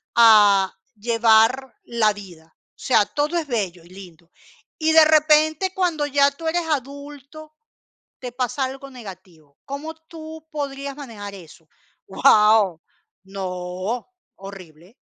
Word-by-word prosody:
a 205 -4 +6 0.2
llevar 230 +3 +2
la 225 -3 +1
vida? 175 -6 -14 0.2
O - - -71
sea, 215 -5 +2
todo 300 +4 -2
es 315 -3 -3
bello 190 -8 -3
y - - -19
lindo, 175 -3 -14 0.5
y 315 0 +1
de 320 -1 +7
repente, 310 +3 +3
cuando 340 -6 -1
ya 280 0 +3
tú 320 +3 -8
eres 345 +1 -1
adulto, 290 +2 -6 0.6
te 250 -2 -7
pasa 255 +2 -2
algo 270 +1 -6
negativo, 185 - -13
¿cómo 290 +4 -6
tú 320 -1 -12
podrías 280 -2 -5
manejar 210 -8 -9
eso? 165 -3 -15 0.4
Guau, 210 -3 +4 0.4
no, 185 +3 -5 0.3
horrible. 190 - -13
240 Hz, 125 wpm, -21 LUFS, 195-295 Hz, 0.6 s, de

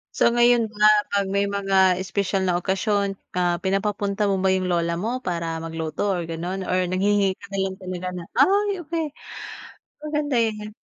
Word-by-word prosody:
So - - +4
ngayon 240 -1 +4
ba 210 -1 -4 0.3
pag 200 -1 +2
may 200 0 +1
mga 195 -2 +3
espesyal 190 +1 -1
na 180 -2 +1
okasyon, 195 +2 0 0.2
ah, 175 -1 +1
pinapapunta 200 +1 0
mo 195 -1 0
ba 190 - +4
yung 185 -1 0
lola 170 -1 0
mo 240 +6 -3
para 170 -2 -2
mag-luto 165 +4 -2
or 175 -3 -2
gano'n 175 +3 -4
or 185 0 +1
naghihinge 195 +2 +2
ka - - -12
na 200 0 -5
lang 190 0 -3
talaga 185 -1 -5
na 180 -1 -6
ay 400 -2 +3
okey. 325 0 -2 1.0
Maganda 295 -3 -1
yun 215 -2 -1
195 Hz, 170 wpm, -23 LUFS, 180-210 Hz, 1.0 s, So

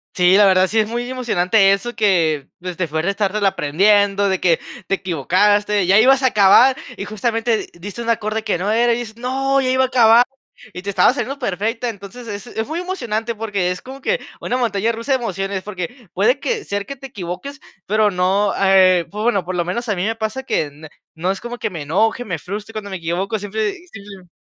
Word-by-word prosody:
Sí, 180 +1 +4
la 205 0 +6
verdad 185 0 +4
sí 220 +3 0
es 215 - +2
muy 240 +2 -3
emocionante 205 -5 +2
eso 240 +5 -3
que, 165 -9 +1
pues, 180 0 -6
te 175 -1 -2
fue 160 +2 -2
de 195 - +1
estártelo 205 0 -1
aprendiendo, 200 +4 +2
de 190 -1 0
que 170 -3 +2 0.3
te 195 - +1
equivocaste, 200 +4 +1
ya 195 +4 +5
ibas 265 +3 +5
a 260 - +5
acabar, 225 +5 +6 0.2
y 200 - -5
justamente 225 +2 0
di - - -6
diste 205 +6 -7
un 235 - -4
acorde 220 -1 -1
que - - 0
no 195 +5 -1
era, 235 +1 +3
y - - -1
dices: 230 -2 -7
"No, 270 +3 0
ya 255 - 0
iba 260 0 +3
a 260 - +2
acabar". 240 -1 +5 0.5
Y 180 - -7
te 200 - -5
estaba 195 +4 +4
saliendo 275 0 -4
perfecta, 230 +1 -2
entonces, 215 +3 -9
es 205 +2 -6
es 220 -2 -4
muy 320 +3 -3
emocionante, 235 - -3
porque 205 -4 -2
es 180 - -4
como 265 +1 -10
que 485 - 0 0.2
una 250 - -1
montaña 230 -3 0
rusa 230 +4 -5
de 265 - +3
emociones. 195 -2 -3
Porque 205 +3 -7
puede 240 +8 +2
que 455 - -2
ser 200 0 -3
que 275 - -6
te 270 0 -10
equivoques, 250 - -7 0.3
pero 215 +1 +2
no, 195 +2 +1
eh, 185 -3 +5
pues, 210 +1 -5
bueno, 205 -6 +1
por 185 - -4
lo 175 -1 0
menos 235 +7 -3
a 210 - 0
mí 180 - -2
me 225 +2 -1
pasa 220 +4 -3
que 265 - 0
n 150 +1 -11 0.2
no 170 +3 -3
es 195 - -4
como 240 0 -7
que - - -2
me 165 -6 -6
enoje, 220 +10 0
me 170 -6 -4
frustre 205 +6 -7
cuando 215 -2 -6
me 190 - -4
equivoco, 180 +6 -2
siempre 215 - -2
sí 360 -2 -15
sí. 200 -3 -11
210 Hz, 230 wpm, -19 LUFS, 190-235 Hz, 0.5 s, la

